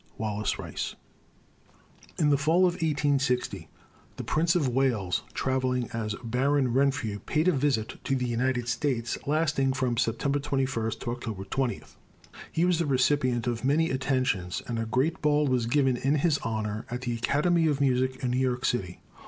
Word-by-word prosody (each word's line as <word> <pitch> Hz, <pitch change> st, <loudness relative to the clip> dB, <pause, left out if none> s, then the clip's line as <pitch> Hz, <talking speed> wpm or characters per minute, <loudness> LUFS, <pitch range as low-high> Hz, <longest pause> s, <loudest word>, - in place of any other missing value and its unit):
WALLACE 105 Hz, -1 st, -2 dB
RICE. -, -, -5 dB, 1.2 s
In 150 Hz, -1 st, +3 dB
the 140 Hz, -, +4 dB
fall 160 Hz, +5 st, +3 dB
of 180 Hz, -, +2 dB
1860 145 Hz, -6 st, 0 dB, 0.5 s
the -, -, -6 dB
Prince 165 Hz, +3 st, +1 dB
of 155 Hz, -6 st, +2 dB
Wales, 120 Hz, -8 st, +1 dB
travelling 130 Hz, -2 st, 0 dB
as 110 Hz, -2 st, -3 dB
Baron 130 Hz, +2 st, +1 dB
Renfrew, 130 Hz, -6 st, +1 dB
paid 155 Hz, -, 0 dB
a -, -, +6 dB
visit 135 Hz, -7 st, -1 dB
to 135 Hz, -, +1 dB
the 125 Hz, -1 st, -1 dB
United 120 Hz, 0 st, 0 dB
States, 120 Hz, -1 st, -1 dB
lasting 145 Hz, -3 st, +1 dB
from 130 Hz, -3 st, -1 dB
September 140 Hz, +6 st, 0 dB
21 135 Hz, -5 st, -1 dB
to 120 Hz, -, -3 dB
October 115 Hz, -5 st, -5 dB
20. 130 Hz, +4 st, -2 dB, 0.7 s
He 165 Hz, -, +1 dB
was 180 Hz, -2 st, +2 dB
the 170 Hz, -, 0 dB
recipient 130 Hz, -2 st, +2 dB
of 120 Hz, -1 st, -2 dB
many 155 Hz, +5 st, +2 dB
attentions, 130 Hz, -9 st, -1 dB
and 115 Hz, -2 st, -2 dB
a 115 Hz, -, -2 dB
great 135 Hz, +8 st, 0 dB
ball 150 Hz, 0 st, +3 dB
was 125 Hz, -4 st, +1 dB
given 135 Hz, 0 st, +2 dB
in 135 Hz, +4 st, +1 dB
his 150 Hz, 0 st, +2 dB
honor 110 Hz, -1 st, -3 dB
at 125 Hz, +1 st, -4 dB
the 120 Hz, -2 st, -2 dB
Academy 155 Hz, +8 st, +2 dB
of 145 Hz, -3 st, +1 dB
Music 130 Hz, -1 st, +1 dB
in 125 Hz, -, 0 dB
New 125 Hz, -, +1 dB
York 130 Hz, 0 st, 0 dB
city. 90 Hz, -7 st, -2 dB
130 Hz, 170 wpm, -27 LUFS, 120-145 Hz, 1.2 s, a